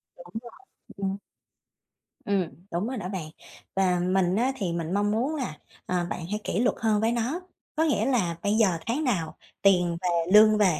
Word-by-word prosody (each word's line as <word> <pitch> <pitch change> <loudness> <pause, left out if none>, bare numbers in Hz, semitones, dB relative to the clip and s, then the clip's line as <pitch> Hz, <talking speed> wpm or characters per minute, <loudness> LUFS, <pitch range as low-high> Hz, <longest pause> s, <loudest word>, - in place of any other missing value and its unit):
Đúng 175 - -13 0.7
rồi. 195 - -1
Ừm. 195 - -4 1.1
Ừm, 200 -2 +2 0.3
đúng 175 +6 -1
rồi 260 - -3
đó 185 -4 -4
bạn. 180 -6 -4 0.5
Và 185 -2 +2
mình 185 0 +2
á, 245 +5 +2
thì 185 -8 -2
mình 170 0 -3
mong 205 +1 +2
muốn 255 +8 0
là, 250 - -4 0.3
ờ, 180 -1 0
bạn 170 - -4
hãy 210 - -1
kỷ 190 - -1
luật 245 +2 +2
hơn 215 -2 +2
với 225 +1 +2
nó, 240 +9 -1 0.3
có 315 - +2
nghĩa 285 -9 +2
là 215 -11 +1
bây 205 - +2
giờ 205 -6 +3
tháng 265 +7 -1
nào 185 - -1 0.3
tiền 180 -3 +4
về, 170 -1 0
lương 215 0 +8
về 185 -7 +3
200 Hz, 195 wpm, -27 LUFS, 180-225 Hz, 1.1 s, lương